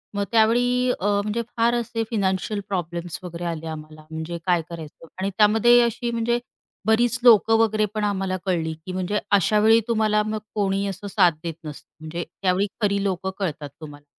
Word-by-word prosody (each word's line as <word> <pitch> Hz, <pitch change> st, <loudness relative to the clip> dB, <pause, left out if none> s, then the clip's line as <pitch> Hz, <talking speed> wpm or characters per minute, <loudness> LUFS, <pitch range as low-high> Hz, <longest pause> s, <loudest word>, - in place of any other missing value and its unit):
मग 200 Hz, -, 0 dB
त्यावेळी 245 Hz, +3 st, +3 dB
अ, 190 Hz, -, -4 dB, 0.2 s
म्हणजे 215 Hz, +3 st, -1 dB, 0.2 s
फार 235 Hz, +1 st, +3 dB
असे 230 Hz, -1 st, -2 dB
फायनान्शियल 200 Hz, -1 st, 0 dB
प्रॉब्लेम्स 175 Hz, -2 st, -4 dB
वगैरे 175 Hz, 0 st, -6 dB
आले 165 Hz, -1 st, -4 dB
आम्हाला. 155 Hz, 0 st, -9 dB
म्हणजे 160 Hz, +2 st, -5 dB
काय 175 Hz, -2 st, +2 dB
करायचं? 165 Hz, -1 st, -9 dB
आणि 195 Hz, +1 st, -1 dB
त्यामध्ये 225 Hz, +3 st, +5 dB
अशी 235 Hz, +1 st, -1 dB
म्हणजे 235 Hz, +1 st, 0 dB, 0.5 s
बरीच 235 Hz, +2 st, +3 dB
लोक 225 Hz, -3 st, +6 dB
वगैरे 220 Hz, -1 st, +3 dB
पण 215 Hz, -, -1 dB
आम्हाला 195 Hz, -2 st, -1 dB
कळली 165 Hz, -4 st, 0 dB
की 185 Hz, -, -5 dB
म्हणजे 185 Hz, +3 st, -1 dB
अशावेळी 210 Hz, +3 st, +5 dB
तुम्हाला 215 Hz, -2 st, +2 dB
मग 215 Hz, 0 st, -2 dB, 0.2 s
कोणी 200 Hz, -1 st, 0 dB
असं 200 Hz, +1 st, -6 dB
साथ 185 Hz, -4 st, +4 dB
देत 165 Hz, -1 st, -3 dB
नसतं. 150 Hz, -2 st, -9 dB
म्हणजे 160 Hz, +2 st, -5 dB, 0.2 s
त्यावेळी 190 Hz, +1 st, +2 dB
खरी 200 Hz, -1 st, +1 dB
लोक 190 Hz, -1 st, -2 dB
कळतात 155 Hz, -6 st, -3 dB
तुम्हाला 145 Hz, -1 st, -11 dB
200 Hz, 170 wpm, -23 LUFS, 170-220 Hz, 0.5 s, लोक